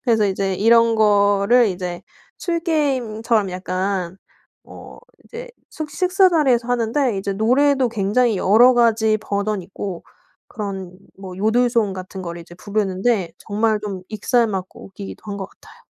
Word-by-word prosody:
그래서 220 -4 +2
이제 195 0 -1
이런 230 +3 +4
거를 205 +2 +3
이제 180 -1 -5 0.4
술 335 -2 -2
게임처럼 240 - 0
약간 185 0 -3 0.5
어 - - -13 0.3
이제 485 +1 -9 0.2
숙 310 -2 -6
식사 370 +1 +3
자리에서 260 -8 +2
하는데 240 0 0
이제 195 +1 -3
노래도 255 +5 +2
굉장히 220 +1 +1
여러 235 +7 +5
가지 220 -2 +2
버전이 200 -2 -3
있고 190 -1 -7 0.4
그런 190 -4 -6 0.2
뭐 185 -2 -9
요들송 225 0 +1
같은 185 0 -8
거를 170 -1 -6
이제 175 +1 -13
부르는데 200 -1 -1
정말 215 +1 0
좀 195 -3 -6
익살맞고 215 -3 -1
웃기기도 195 0 -10
한 200 -1 -5
것 190 -1 -5
같아요. - - -20
215 Hz, 300 characters per minute, -20 LUFS, 195-240 Hz, 0.5 s, 여러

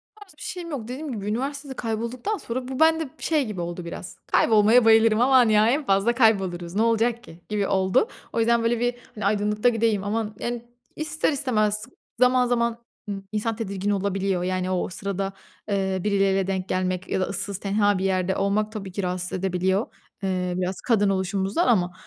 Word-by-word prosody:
O 430 - -20
tarz 400 -5 -14
bir - - -15
şeyim 350 -2 -5
yok. 265 -6 -4
Dediğim 275 +3 -5
gibi 205 -3 -5
üniversitede 275 +5 -3
kaybolduktan 235 - -3
sonra 250 +2 -5
bu 260 -1 -5
bende, 320 -2 +3
şey, 305 -5 +1
gibi 200 -5 -5
oldu 175 0 -5
biraz. 170 - -7
Kaybolmaya 225 +2 +5
bayılırım 225 0 +5
aman 255 -3 +5
ya 215 +1 +5
en 285 +3 +1
fazla 195 +3 +2
kayboluruz. 190 -7 +2
Ne 215 - +2
olacak 230 +1 +1
ki 170 -6 -14
gibi 205 -2 0
oldu. 190 - +2 0.3
O - - 0
yüzden 230 0 +3
böyle 230 0 +1
bir, 245 0 0 0.2
hani, 210 -2 -4
aydınlıkta 210 +3 +2
gideyim 225 -3 +1
ama, 215 +1 -2
yani, 240 0 -4 0.3
ister 310 0 0
istemez, 215 -6 0 0.3
zaman 250 0 +4
zaman, 235 -1 0 0.3
ımm, 195 -1 -4
insan 215 +1 -1
tedirgin 200 -3 -3
olabiliyor. 195 -2 0
Yani, 185 0 -1
o 180 - -1
sırada, 195 +1 -3 0.4
eee, 190 -1 0
birileriyle 195 -2 +2
denk 190 -1 -2
gelmek 185 0 -1
ya - - 0
da - - +1
ıssız 200 -1 -3
tenha 205 0 +2
bir 190 - -2
yerde 190 0 +1
olmak 210 +2 0
tabii 195 -4 -6
ki 195 +2 -4
rahatsız 180 0 -3
edebiliyor. 190 +2 0 0.4
Eee, 185 -1 -1
biraz 185 +1 -1
kadın 205 -4 +2
oluşumuzdan 195 - 0
ama. 180 -6 +2
210 Hz, 185 wpm, -24 LUFS, 190-240 Hz, 0.4 s, Kaybolmaya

